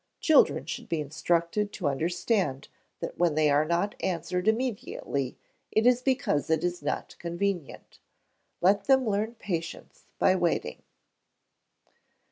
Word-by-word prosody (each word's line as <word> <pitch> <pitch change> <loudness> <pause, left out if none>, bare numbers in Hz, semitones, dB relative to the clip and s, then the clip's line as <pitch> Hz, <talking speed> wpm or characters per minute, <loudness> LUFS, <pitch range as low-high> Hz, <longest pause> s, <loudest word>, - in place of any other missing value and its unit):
Children 315 - +4
should - - -6
be 165 - 0
instructed 170 +7 0
to 180 - -2
understand 165 - -1 0.3
that - - -5
when 170 -3 +2
they 155 -1 +3
are 145 +1 +4
not 170 +5 0
answered 180 +1 -2
immediately, 220 - -1 0.3
it 220 - +2
is 250 0 +5
because 255 - 0
it 160 -1 +2
is 175 -1 -1
not 145 +1 -3
convenient. 175 -1 -4 0.6
Let 195 +3 +3
them 265 -2 +4
learn 215 +3 -1
patience 170 -6 -6
by 185 - +4
waiting. 175 -2 -1
175 Hz, 125 wpm, -28 LUFS, 160-210 Hz, 0.6 s, is